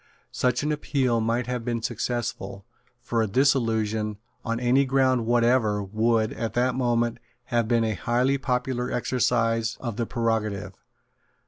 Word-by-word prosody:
Such 125 +1 0
an 150 - 0
appeal 130 -5 0
might 115 +2 0
have 125 -1 -3
been 115 -1 -2
successful: 115 -5 -3 0.3
for 115 -1 -1
a 110 - +1
dissolution, 110 -4 +1 0.3
on 115 0 -2
any 125 +3 +3
ground 130 -3 +2
whatever, 120 -3 +2
would, 110 +2 +1
at 115 - -4
that 125 +1 +2
moment, 120 -2 0 0.3
have 120 -2 +2
been 115 -1 +2
a 110 -1 0
highly 125 +8 +1
popular 125 -1 -1
exercise 115 -2 0
of 115 -4 -5
the 115 -2 -1
prerogative. 110 -5 -1
120 Hz, 140 wpm, -25 LUFS, 110-125 Hz, 0.3 s, any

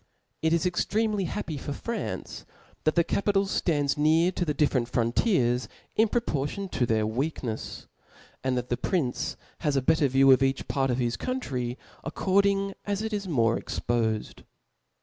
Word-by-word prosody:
It 160 - +2
is 170 +1 +2
extremely 205 +3 +1
happy 155 -2 -4
for 145 - -4
France, 235 +9 -5 0.4
that 155 - +3
the 170 - +5
capi 200 +4 0
tal 195 0 +3
ftands 150 -8 0
near 160 +4 +4
to 180 - -2
the 155 -3 0
difFerent 135 -5 +2
frontiers 125 - +1 0.3
in 220 - +4
propor 150 - 0
tion 200 -1 -5
to 125 -7 0
their 110 -1 +2
wcakncfs; 120 0 -3 0.6
and 130 -1 +1
the 120 0 -1
prince 150 -10 -1 0.2
has 150 -4 0
a 135 - +3
better 155 +1 +4
view 135 +1 +5
of 130 -1 +6
each 135 0 +1
part 135 -1 0
of 125 - +1
his 120 -2 0
country 130 - -3 0.3
according 200 0 +1
as 205 +1 -2
it 220 0 -3
is 205 -2 -2
more 115 -8 +2
expofed. 110 -3 -2
150 Hz, 165 wpm, -27 LUFS, 125-195 Hz, 0.6 s, of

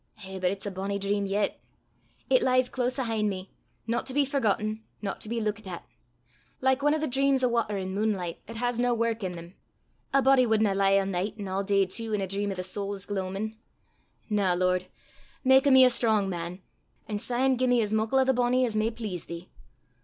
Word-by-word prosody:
Eh, 190 0 -7
but 180 -1 +2
it's 195 +2 -5
a 200 - -3
bonnie 195 +2 -3
dream 200 0 -1
yet! 200 +1 -1 0.7
It - - +4
lies 255 -1 +3
close 255 0 -1
'ahint 225 -5 0
me, 190 -1 -6 0.3
no 230 +1 0
to 260 - -7
be 290 -1 +4
forgotten, 215 -5 0 0.2
no 200 -2 -3
to 215 - -9
be 235 0 -1
luikit 215 -1 -3
at 175 -2 -7 0.7
like 265 +1 +2
ane 295 +2 +3
o' - - -1
thae 310 - -1
dreams 270 0 +2
o' - - +5
watter 230 -4 0
an' 190 -1 -4
munelicht 195 -5 -1
'at 230 - -8
has 245 +1 -1
nae 245 0 +2
wark 230 -1 -1
i' - - 0
them: 170 0 -9 0.6
a 275 - +4
body 265 -2 +5
wadna 220 -2 +3
lie 195 0 +3
a' 195 - -1
nicht 195 +3 -3
an' 200 - -4
a' 190 +1 -1
day 195 -1 +3
tu 225 +4 -3
in 210 - 0
a - - 0
dream 200 +2 -2
o' - - -4
the 185 - -4
sowl's 200 +1 -4
gloamin'! 200 +2 -3 0.7
Na, 200 -4 +2
Lord; 185 0 +1 0.6
mak 265 +1 +5
o' - - +6
me 260 -1 +8
a 250 - +5
strong 220 -5 +2
man, 175 0 -5 0.4
an' 210 -2 -3
syne 255 +4 +1
gie 255 +1 +1
me 245 -1 +4
as 210 0 -3
muckle 220 +4 +1
o' 265 - +5
the 265 0 +2
bonnie 250 +1 +2
as 225 -3 -3
may 215 +1 +2
please 215 -7 -6
thee. 170 +1 -8
215 Hz, 220 wpm, -27 LUFS, 195-245 Hz, 0.7 s, me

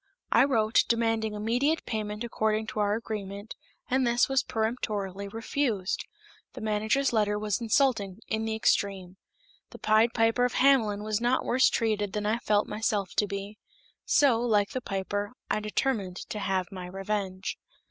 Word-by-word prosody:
I - - +6
wrote, 225 -5 +3
demanding 225 -2 0
immediate 245 +9 0
payment 210 0 -3
according 220 -2 0
to - - -4
our 205 0 +2
agreement, 205 -2 -6 0.3
and 260 +1 +1
this 240 +1 +3
was 270 -1 +2
peremptorily 215 -5 -2
refused. 225 -2 -2 0.5
The - - -8
manager's 220 +5 +1
letter 210 -2 +2
was 210 +1 -1
insulting 225 -5 +1
in 220 0 -1
the 220 0 -1
extreme. 195 -4 0 0.5
The - - -11
Pied 220 +2 +3
Piper 225 +1 +3
of 250 - +1
Hamelin 225 -7 +3
was 215 +1 -1
not 245 +2 +1
worse 255 +2 +4
treated 210 -3 0
than 210 -1 -2
I 220 +3 +1
felt 210 -3 +2
myself 210 -3 -1
to 210 - +3
be; 200 +1 -6 0.4
so, 265 -6 +4
like 210 -4 +2
the 255 -3 -3
piper, 205 +1 -3 0.2
I - - +2
determined 210 -3 -1
to 210 - -3
have 190 -2 -1
my 185 -2 -7
revenge. 195 0 -3
215 Hz, 155 wpm, -28 LUFS, 205-235 Hz, 0.5 s, I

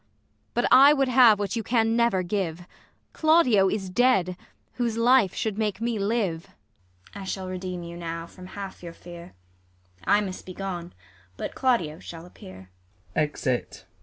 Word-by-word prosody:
But 240 - +1
I 275 +3 +8
would 270 -3 +1
have 240 -4 +6
what 205 +3 -3
you 230 - -1
can 225 0 +1
never 235 -6 +2
give; 175 -2 -3 0.5
Claudio 285 - +4
is 195 -2 -3
dead, 195 -6 +2 0.4
whose 235 -2 -2
life 235 -4 +4
should 220 -1 -2
make 210 -3 -1
me 230 -1 -2
live. 200 -6 -1 0.7
ISAB. 200 - -8
I - - -6
shall 190 0 -4
redeem 185 -1 -5
you 170 0 -8
now 165 -1 -5
from 180 +2 -13
half 195 -1 -7
your 170 -1 -8
fear; 175 - -12 0.7
I 205 - +3
must 190 -2 -6
be 185 - -8
gone, 180 -3 -5 0.4
but - - -5
Claudio 180 -12 0
shall 165 0 -10
appear. 95 - -13
195 Hz, 155 wpm, -25 LUFS, 175-235 Hz, 0.7 s, I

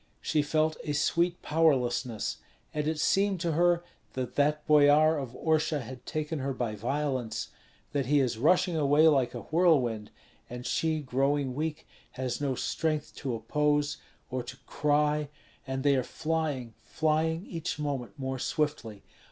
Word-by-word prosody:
She 150 - +1
felt 155 +1 +1
a 150 - -2
sweet 170 +4 +1
powerlessness, 130 -7 +1 0.4
and 150 0 -1
it 155 -1 -1
seemed 195 +3 +2
to 170 -1 0
her 175 +2 +3 0.3
that 130 -1 -4
that 150 +1 +1
boyar 150 +1 +6
of 130 -3 -6
Orsha 155 -2 +1
had 125 +1 -10
taken 155 0 -3
her 135 +1 -2
by 120 -4 -2
violence: 130 +1 -2 0.4
that 140 -4 -1
he 145 +1 +4
is 125 -4 0
rushing 180 - +3
away 150 +1 +4
like 135 -5 +3
a - - -5
whirlwind, 140 -11 +2 0.4
and 125 +1 -7
she 160 -1 0
growing 135 0 0
weak 155 +2 -3 0.3
has 130 0 -3
no 135 -2 0
strength 155 +3 -2
to 130 -4 -3
oppose 145 +5 0 0.3
or 130 0 -1
to 125 +1 -9
cry, 150 0 +1 0.4
and 135 0 -3
they 140 -1 +4
are 130 - +2
flying, 150 -4 -2
flying 160 - 0
each 165 -2 -4
moment 145 -3 -4
more 130 -1 -3
swiftly. 125 -9 -2
145 Hz, 150 wpm, -29 LUFS, 130-155 Hz, 0.4 s, boyar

